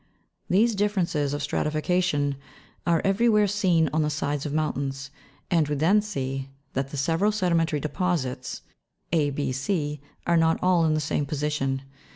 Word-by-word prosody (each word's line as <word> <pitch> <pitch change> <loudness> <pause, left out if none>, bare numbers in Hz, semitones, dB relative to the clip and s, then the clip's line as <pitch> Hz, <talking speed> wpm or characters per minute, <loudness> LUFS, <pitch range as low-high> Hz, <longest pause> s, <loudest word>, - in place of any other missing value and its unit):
These 220 +5 +4
differences 185 -8 0
of 145 0 -3
stratification 150 -1 0 0.5
are 170 -2 +3
everywhere 210 +2 +4
seen 185 -5 +2
on 155 - +2
the 150 - +1
sides 145 0 -2
of - - -4
mountains, 140 -3 -2 0.4
and 165 -4 +3
we 150 - -1
then 175 +9 +4
see 135 -9 -4 0.2
that 135 +1 -2
the 145 - -6
several 165 +9 +2
sedimentary 170 -6 +1
deposits, 150 -5 -2 0.5
a, 155 -3 +2
6, 135 -2 -2
c, 150 -2 -2 0.2
are 170 -1 +3
not 165 0 +3
all 180 -2 +3
in 155 -1 +2
the - - +1
same 145 -1 -1
position. 140 -2 -1
155 Hz, 155 wpm, -26 LUFS, 145-180 Hz, 0.5 s, These